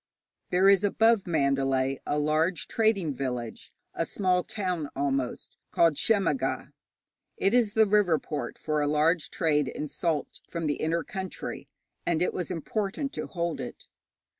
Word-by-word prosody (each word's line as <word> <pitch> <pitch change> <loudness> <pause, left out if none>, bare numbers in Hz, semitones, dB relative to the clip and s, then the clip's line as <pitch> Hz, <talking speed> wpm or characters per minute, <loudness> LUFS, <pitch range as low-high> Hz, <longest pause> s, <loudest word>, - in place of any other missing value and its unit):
There 185 +2 +4
is 195 -1 +6
above 220 0 +3
Mandalay 135 -4 +1
a 145 - 0
large 155 +3 +1
trading 205 -9 +1
village 125 -3 -5 0.2
a - - -1
small 180 0 +1
town 180 -8 -3
almost 135 -2 -2
called 165 -2 +4
Shemmaga. 205 - 0 0.7
It 195 - +2
is 230 -4 +3
the 220 0 +6
river 200 -5 +3
port 150 -1 -5
for 155 -1 -1
a 145 - +1
large 155 +3 +2
trade 150 -4 +1
in 150 - -4
salt 155 -1 -2
from 170 -2 -3
the 145 -1 0
inner 165 +1 0
country, 190 +4 -6 0.4
and 170 0 +1
it - - 0
was 180 - -3
important 200 - -3
to - - -4
hold 170 -2 -2
it. - - -8
165 Hz, 150 wpm, -28 LUFS, 150-195 Hz, 0.7 s, is